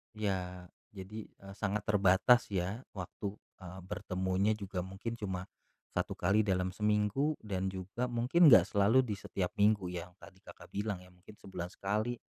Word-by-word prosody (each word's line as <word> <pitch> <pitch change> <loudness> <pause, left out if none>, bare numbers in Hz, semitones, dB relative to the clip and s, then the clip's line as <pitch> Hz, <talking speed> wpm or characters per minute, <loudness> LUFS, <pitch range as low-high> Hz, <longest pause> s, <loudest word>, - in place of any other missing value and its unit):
Iya. 90 -4 -3 0.2
Jadi, 105 +2 -7 0.2
e 95 - -13
sangat 105 0 -2
terbatas 105 +4 +4
ya 95 +5 -2
waktu, 100 +1 -5 0.3
eee, 90 +1 -8
bertemunya 95 +2 0
juga 100 -4 -3
mungkin 95 +5 -5
cuma 95 -5 -4 0.5
1 - - -1
kali 95 +4 +2
dalam 95 -2 0
seminggu, 105 +9 +1
dan 95 -3 -2
juga 95 +6 -3
mungkin 125 +9 +5
nggak 95 -7 +9
selalu 110 +6 +5
di 115 - -4
setiap 95 -1 -3
minggu 100 -2 +4
yang 90 0 -6
tadi 85 +2 -15
Kakak - - -13
bilang, 100 -2 -2
ya - - -16
mungkin 90 +4 -16
sebulan 90 -3 -6
sekali. 105 +5 -1
100 Hz, 155 wpm, -33 LUFS, 95-110 Hz, 0.5 s, nggak